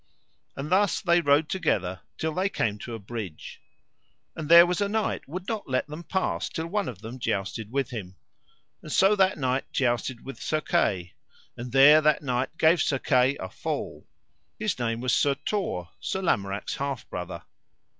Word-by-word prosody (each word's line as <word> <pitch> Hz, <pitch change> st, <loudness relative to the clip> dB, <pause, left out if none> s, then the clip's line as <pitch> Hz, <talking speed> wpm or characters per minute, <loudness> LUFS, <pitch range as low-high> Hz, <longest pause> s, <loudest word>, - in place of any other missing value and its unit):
And 145 Hz, +4 st, -5 dB
thus 200 Hz, +1 st, +3 dB
they 175 Hz, -3 st, +3 dB
rode 145 Hz, 0 st, +3 dB
together 95 Hz, -, -1 dB, 0.2 s
till 160 Hz, 0 st, -2 dB
they 185 Hz, +4 st, 0 dB
came 105 Hz, -, -1 dB
to 115 Hz, -, -6 dB
a -, -, -5 dB
bridge. 100 Hz, -6 st, -8 dB, 0.7 s
And 155 Hz, -1 st, -6 dB
there 170 Hz, +1 st, +10 dB
was 180 Hz, +2 st, -1 dB
a 200 Hz, -, +1 dB
knight 220 Hz, +1 st, -1 dB
would 180 Hz, +6 st, -6 dB
not 220 Hz, -9 st, -4 dB
let 130 Hz, 0 st, +1 dB
them 150 Hz, +3 st, -8 dB
pass 160 Hz, -, -1 dB
till 160 Hz, -, -4 dB
one 200 Hz, +4 st, -1 dB
of 105 Hz, -4 st, -10 dB
them 120 Hz, +4 st, -7 dB
jousted 105 Hz, 0 st, -3 dB
with 135 Hz, -1 st, -1 dB
him; 95 Hz, -6 st, -7 dB, 0.7 s
and 155 Hz, -, -9 dB
so 195 Hz, +6 st, +5 dB
that 190 Hz, -1 st, +3 dB
knight 130 Hz, -1 st, -1 dB
jousted 120 Hz, -1 st, -1 dB
with 135 Hz, -, -8 dB
Sir 155 Hz, -, 0 dB
Kay, 90 Hz, -, 0 dB, 0.4 s
and 120 Hz, 0 st, -7 dB
there 140 Hz, +4 st, +8 dB
that 155 Hz, 0 st, +2 dB
knight 130 Hz, +3 st, -2 dB
gave 160 Hz, 0 st, +4 dB
Sir 135 Hz, -, +1 dB
Kay 130 Hz, +1 st, +2 dB
a 95 Hz, -, -5 dB
fall: -, -, -5 dB, 0.5 s
his 210 Hz, -9 st, -2 dB
name 115 Hz, -1 st, -1 dB
was 125 Hz, -1 st, +1 dB
Sir 140 Hz, -1 st, +3 dB
Tor, 135 Hz, -, -3 dB
Sir 190 Hz, -, -3 dB
Lamorak's 100 Hz, -, -1 dB
half 140 Hz, -2 st, -4 dB
brother. 90 Hz, -1 st, -6 dB
135 Hz, 180 wpm, -26 LUFS, 115-170 Hz, 0.7 s, there